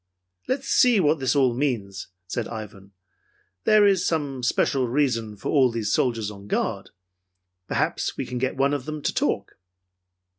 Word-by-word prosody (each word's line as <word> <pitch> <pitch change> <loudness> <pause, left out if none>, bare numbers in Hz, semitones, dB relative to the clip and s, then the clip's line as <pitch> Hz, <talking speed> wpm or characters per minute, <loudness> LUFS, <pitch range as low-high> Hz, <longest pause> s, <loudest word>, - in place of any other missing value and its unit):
"Let's 270 +1 -2
see 245 -4 +4
what 155 -3 +2
this 130 +1 +1
all 130 -4 +3
means," 115 -8 -2 0.2
said 110 +5 -3
Ivan. 105 -3 -9 0.7
"There 215 -1 +6
is 195 -3 +3
some 145 -7 -1
special 125 +1 +1
reason 115 -5 0
for - - -5
all 135 -4 +4
these 115 -3 -2
soldiers 115 -4 0
on 100 -1 -12
guard. - - -2 0.8
Perhaps - - -1
we - - -2
can 125 0 -4
get 130 +1 -1
one 140 +1 +2
of 140 -3 -3
them 155 -1 -6
to - - 0
talk." - - -1
130 Hz, 160 wpm, -24 LUFS, 110-150 Hz, 0.8 s, There